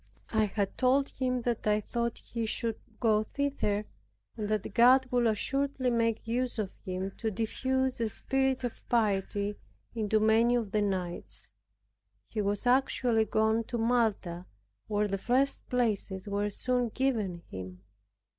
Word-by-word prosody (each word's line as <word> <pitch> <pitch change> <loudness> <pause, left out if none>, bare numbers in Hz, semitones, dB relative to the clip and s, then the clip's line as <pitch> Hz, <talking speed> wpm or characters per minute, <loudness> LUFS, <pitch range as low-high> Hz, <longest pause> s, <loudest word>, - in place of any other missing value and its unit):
I 220 -1 +4
had 200 -1 -2
told 270 +2 +3
him 255 -2 -1
that 235 -3 -1
I 210 0 +4
thought 235 +2 -2
he 230 -2 -4
should 225 0 -2 0.2
go 215 -3 +3
thither, 215 -4 -1 0.5
and 210 -2 -3
that 215 -2 -1
God 255 +2 +6
would 245 -1 +3
assuredly 265 +4 0
make 230 -1 0
use 245 +2 -1
of 210 -4 -2
him 185 +1 -3
to 225 - -1
diffuse 260 +4 -1
a 225 - +1
spirit 265 +3 0
of 245 - -4
piety 205 -3 0 0.3
into 215 -1 +1
many 225 +3 +4
of 225 -5 -1
the 210 - +2
knights. 185 -4 -3 0.8
He 220 - -4
has 205 +1 -1
actually 245 -3 +3
gone 220 +1 +2
to 240 - -3
Malta, 220 -7 0 0.4
where 210 0 +1
the 195 -1 -2
first 260 +6 +1
places 210 -5 -1
were 205 +1 0
soon 245 +3 0
given 215 -9 -1
him. 90 0 -8
225 Hz, 145 wpm, -30 LUFS, 205-245 Hz, 0.8 s, God